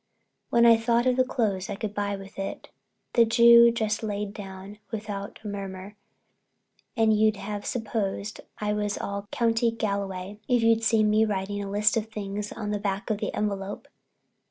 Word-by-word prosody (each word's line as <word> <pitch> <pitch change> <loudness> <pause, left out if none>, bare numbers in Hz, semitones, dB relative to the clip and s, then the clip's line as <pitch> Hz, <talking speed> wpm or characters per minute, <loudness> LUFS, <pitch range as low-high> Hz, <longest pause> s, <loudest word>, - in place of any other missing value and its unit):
When 235 0 +4
I 230 -1 +8
thought 235 +1 +1
of 255 -1 +3
the 255 - +4
clothes 215 -7 -1
I - - -3
could 210 0 -4
buy 205 -1 -1
with 195 0 -11
it, 195 - -5 0.4
the 235 - +6
Jew 235 +1 +7
just 220 -2 -1
lay 210 -1 -2
down 200 0 -9
without 205 -3 -5
a - - -6
murmur 195 0 -6 1.0
and 220 -1 +4
you'd 215 0 +3
have 205 0 -5
supposed 215 -3 -3 0.2
I 210 0 -1
was 210 -1 -1
all 200 0 -4
County 230 +1 +2
Galway 200 -3 -3
if 245 -2 +2
you'd 225 0 +4
seen 220 -2 +3
me 215 +1 +4
writing 205 -1 -2
a 200 - -5
list 210 +3 +2
of 220 0 -2
things 210 -1 -5
on 210 -2 -4
the 205 - -1
back 200 +2 -2
of 210 - -1
the - - -2
envelope. 200 -1 -3
210 Hz, 180 wpm, -26 LUFS, 200-225 Hz, 1.0 s, I